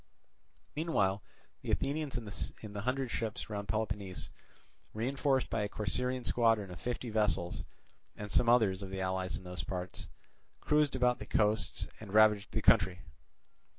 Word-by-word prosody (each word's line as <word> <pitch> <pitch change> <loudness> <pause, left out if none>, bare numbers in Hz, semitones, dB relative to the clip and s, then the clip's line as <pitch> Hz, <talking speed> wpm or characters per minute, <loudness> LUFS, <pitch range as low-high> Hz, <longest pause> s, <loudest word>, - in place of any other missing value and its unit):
Meanwhile 105 - +1 0.4
the - - -7
Athenians 140 -1 0
in 105 -1 -6
the 100 - -4
hundred 130 +2 -1
ships 115 0 -3
round 100 -1 -3
Peloponnese, 100 -2 -3 0.6
reinforced 135 +3 +1
by 110 - +1
a 105 - -1
Corcyraean 125 +5 -1
squadron 115 -5 +2
of 90 - -9
fifty 120 -1 -3
vessels 90 -6 0 0.5
and 105 -1 -7
some 120 - +4
others 105 -6 +4
of 95 - -6
the 95 0 -4
allies 95 -1 -1
in - - -11
those 90 -3 -5
parts, 90 +2 -5 0.5
cruised 150 -2 +2
about 125 -1 +2
the 105 - -7
coasts 105 0 +1
and 105 -2 -7
ravaged 105 -2 +5
the - - -2
country. 90 0 +4
105 Hz, 150 wpm, -33 LUFS, 95-125 Hz, 0.6 s, ravaged